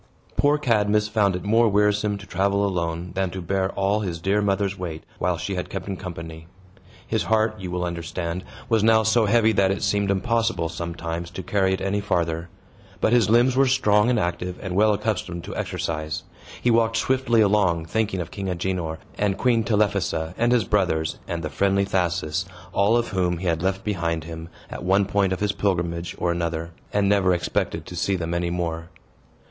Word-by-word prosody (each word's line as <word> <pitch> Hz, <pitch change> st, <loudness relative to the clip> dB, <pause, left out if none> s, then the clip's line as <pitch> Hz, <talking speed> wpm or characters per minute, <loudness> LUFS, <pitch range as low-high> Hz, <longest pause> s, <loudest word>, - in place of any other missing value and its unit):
Poor 145 Hz, +1 st, +3 dB
Cadmus 105 Hz, -6 st, +2 dB
found 105 Hz, -3 st, +2 dB
it 90 Hz, -, -5 dB
more 115 Hz, +2 st, +4 dB
wearisome 105 Hz, 0 st, +2 dB
to 100 Hz, -, -11 dB
travel 100 Hz, +2 st, +1 dB
alone 85 Hz, -2 st, -2 dB
than 95 Hz, -1 st, 0 dB
to 95 Hz, -, -6 dB
bear 95 Hz, +2 st, 0 dB
all 100 Hz, +2 st, +1 dB
his 90 Hz, -5 st, -3 dB
dear 100 Hz, +5 st, +1 dB
mother's 100 Hz, -1 st, 0 dB
weight, 85 Hz, -4 st, -6 dB, 0.2 s
while 90 Hz, -1 st, 0 dB
she 90 Hz, +5 st, -3 dB
had 90 Hz, -1 st, -3 dB
kept 95 Hz, -1 st, -5 dB
him 100 Hz, -, -3 dB
company. 80 Hz, -3 st, -8 dB, 0.6 s
His -, -, -1 dB
heart, 110 Hz, 0 st, +1 dB
you 95 Hz, -1 st, -5 dB
will 90 Hz, 0 st, -2 dB
understand, 85 Hz, +1 st, -4 dB, 0.2 s
was 110 Hz, -3 st, +2 dB
now 110 Hz, 0 st, +5 dB
so 110 Hz, 0 st, +3 dB
heavy 110 Hz, +1 st, +4 dB
that 100 Hz, -2 st, +3 dB
it 95 Hz, -, -1 dB
seemed 100 Hz, -1 st, +1 dB
impossible, 110 Hz, -3 st, +1 dB
sometimes, 85 Hz, 0 st, -4 dB
to 90 Hz, +2 st, -7 dB
carry 95 Hz, 0 st, +1 dB
it 95 Hz, -, -9 dB
any 100 Hz, +1 st, 0 dB
farther. 85 Hz, -3 st, -1 dB, 0.5 s
But 110 Hz, -, +2 dB
his 115 Hz, -5 st, +4 dB
limbs 120 Hz, +3 st, +4 dB
were 135 Hz, +1 st, +4 dB
strong 105 Hz, -4 st, +3 dB
and 120 Hz, -3 st, +2 dB
active, 90 Hz, 0 st, -2 dB
and 95 Hz, -2 st, -5 dB
well 105 Hz, +2 st, +5 dB
accustomed 100 Hz, -5 st, -2 dB
to -, -, -7 dB
exercise. 80 Hz, -1 st, -3 dB, 0.4 s
He 120 Hz, -, +2 dB
walked 115 Hz, 0 st, +3 dB
swiftly 130 Hz, -2 st, +2 dB
along, 95 Hz, -6 st, +2 dB
thinking 105 Hz, +1 st, -1 dB
of 80 Hz, -, -7 dB
King 100 Hz, -1 st, -5 dB
Agenor 90 Hz, -2 st, -2 dB, 0.2 s
and 100 Hz, -2 st, +1 dB
Queen 120 Hz, -3 st, +2 dB
Telephassa, 100 Hz, -6 st, 0 dB
and 120 Hz, +1 st, +2 dB
his 120 Hz, -3 st, +4 dB
brothers, 90 Hz, -6 st, 0 dB
and 85 Hz, -1 st, -3 dB
the 75 Hz, -, -2 dB
friendly 100 Hz, +6 st, +2 dB
Thasus, 90 Hz, -2 st, -1 dB, 0.3 s
all 105 Hz, +4 st, +3 dB
of 120 Hz, -, -1 dB
whom 90 Hz, -3 st, 0 dB
he 90 Hz, -, -6 dB
had 85 Hz, -2 st, +1 dB
left 95 Hz, +1 st, -1 dB
behind 85 Hz, -6 st, -1 dB
him, 80 Hz, 0 st, -8 dB, 0.2 s
at -, -, -6 dB
one 95 Hz, +2 st, +3 dB
point 100 Hz, -1 st, +1 dB
of 95 Hz, -, -2 dB
his 105 Hz, -1 st, +2 dB
pilgrimage 85 Hz, -4 st, -1 dB
or 85 Hz, -, 0 dB
another, 85 Hz, -1 st, -2 dB, 0.2 s
and 100 Hz, -1 st, +2 dB
never 95 Hz, -3 st, +3 dB
expected 85 Hz, -, -2 dB
to 90 Hz, -, -8 dB
see 95 Hz, +3 st, 0 dB
them 85 Hz, -2 st, -3 dB
any 85 Hz, 0 st, 0 dB
more. 85 Hz, -1 st, -3 dB
95 Hz, 195 wpm, -24 LUFS, 85-105 Hz, 0.6 s, now